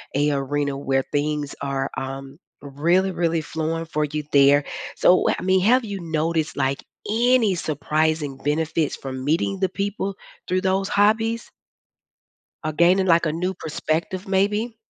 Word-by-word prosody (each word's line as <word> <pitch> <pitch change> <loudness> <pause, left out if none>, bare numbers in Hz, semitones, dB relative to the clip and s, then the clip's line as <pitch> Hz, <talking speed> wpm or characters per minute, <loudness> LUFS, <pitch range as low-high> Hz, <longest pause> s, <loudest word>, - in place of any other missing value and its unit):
a 145 +1 +2
arena 140 0 -1
where 135 -1 0
things 145 0 -1
are, 135 -1 -2
um, 135 0 -6 0.2
really, 170 +7 +1
really 170 -2 0
flowing 160 +1 -3
for 155 -1 -1
you 150 +1 -3
there. 140 0 +5 0.3
So, 180 - +6
wha - - +2
I - - -7
mean, 185 0 +3
have 240 +5 +4
you 200 -3 -5
noticed, 160 -1 -1
like, 135 0 0 0.3
any 230 -3 +3
surprising 155 -1 -1
benefits 155 +2 -1
from 130 -1 -6
meeting 170 +6 0
the 190 - +1
people 200 0 -3 0.3
through 185 0 +1
those 190 0 0
hobbies 225 +3 +2 1.1
or 155 - -1
gaining, 180 +4 +4
like, 170 -1 +4
a 155 - 0
new 180 +3 -1
perspective 165 +3 -3
maybe? 210 +4 0
160 Hz, 150 wpm, -23 LUFS, 145-190 Hz, 1.1 s, So